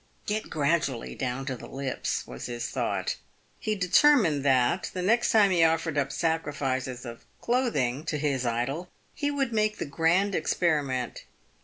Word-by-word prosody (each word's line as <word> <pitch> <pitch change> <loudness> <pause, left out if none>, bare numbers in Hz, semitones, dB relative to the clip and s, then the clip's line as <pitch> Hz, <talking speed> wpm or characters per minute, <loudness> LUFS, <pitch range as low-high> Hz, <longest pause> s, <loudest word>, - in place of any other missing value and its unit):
" - - -37
Get 215 +1 -2
gradually 145 -5 0
down 130 0 -3
to 135 -2 -3
the - - -10
lips," 135 -1 -3
was 60 - -7
his 120 -1 -4
thought. - - -1 0.4
He 215 - -1
determined 185 - +4
that, 135 +5 +2
the 180 - -2
next 230 +5 +3
time 205 -3 +5
he 175 -2 +4
offered 165 -1 +2
up 140 -1 0
sacrifices 135 -6 -2
of 115 -1 -8 0.2
cloth 245 0 0
ing 125 +5 0
to 155 - -1
his 140 -3 0
idol, 125 +9 -2 0.2
he 290 -3 -1
would 275 -4 -1
make 215 -1 +1
the - - -3
grand 170 +7 +2
experiment. 145 -7 0
155 Hz, 165 wpm, -27 LUFS, 130-190 Hz, 0.4 s, time